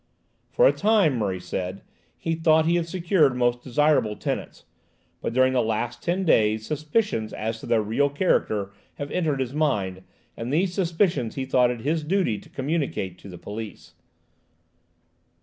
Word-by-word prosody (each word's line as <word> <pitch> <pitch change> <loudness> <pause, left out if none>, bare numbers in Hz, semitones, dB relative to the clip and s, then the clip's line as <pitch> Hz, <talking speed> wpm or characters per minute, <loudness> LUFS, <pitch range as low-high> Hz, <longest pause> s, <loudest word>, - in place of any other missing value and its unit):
For - - +3
a - - +4
time, 205 -9 +3
Murray 95 -4 -1
said, 90 +1 -5 0.3
he 165 - -2
thought 160 -1 +3
he 170 - +2
had 170 -1 -1
secured 170 -6 +2
most 120 -1 +1
desirable 130 -4 +2
tenants, - - -5 0.6
but - - -2
during 130 +2 +3
the 125 - +3
last 110 +2 -2
ten 185 +2 -1
days 110 -7 +3
suspicions 150 - -1
as 110 +1 -3
to - - -9
their 115 -2 +2
real 120 +7 +1
character 110 - 0 0.2
have 145 0 -6
entered 155 -6 0
his 130 -1 -2
mind, 100 -12 0 0.3
and 115 +2 -5
these 175 +4 +1
suspicions 170 - 0
he 135 - -2
thought 125 -2 +3
it 120 -2 -4
his 155 +4 0
duty 160 - 0
to - - -17
communicate 135 - -2
to 100 - -11
the 90 - -9
police. 110 +3 -8
135 Hz, 165 wpm, -25 LUFS, 110-165 Hz, 0.6 s, a